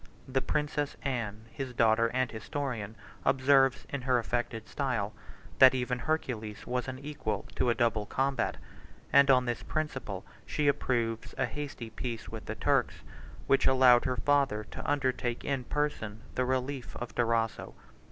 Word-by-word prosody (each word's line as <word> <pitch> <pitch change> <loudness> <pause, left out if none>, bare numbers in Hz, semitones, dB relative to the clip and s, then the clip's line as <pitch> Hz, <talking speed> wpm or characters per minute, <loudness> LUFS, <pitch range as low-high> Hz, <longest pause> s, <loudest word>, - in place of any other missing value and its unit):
The 135 0 0
princess 150 0 -1
Anne, 110 -5 -3
his 130 -1 -5
daughter 115 0 +4
and 130 +1 0
historian, 115 -3 -4 0.3
observes, 135 0 +4
in 140 - -4
her 125 0 +2
affected 120 -1 -2
style, 115 -4 -1 0.5
that 130 0 +9
even 125 -1 -1
Hercules 115 -7 -3
was 125 0 -2
unequal 130 -6 -4
to 125 - +2
a 120 - +3
double 110 -2 +1
combat; 135 +1 0 0.6
and, 140 0 +7
on 125 -1 +5
this 120 -1 -2
principle, 135 -11 -3 0.2
she 150 -1 -1
approves 120 -5 0
a - - +2
hasty 140 -6 -6
peace 115 -1 -5
with - - -7
the - - -4
Turks, - - +1 0.4
which 135 - +4
allowed 130 -2 +6
her 125 -1 0
father 140 -7 +2
to - - -5
undertake 130 -4 0
in 135 -3 -1
person 110 -8 -2
the 125 - 0
relief 130 0 -2
of 120 - -6
Durazzo. 115 -1 0
125 Hz, 150 wpm, -30 LUFS, 115-135 Hz, 0.6 s, that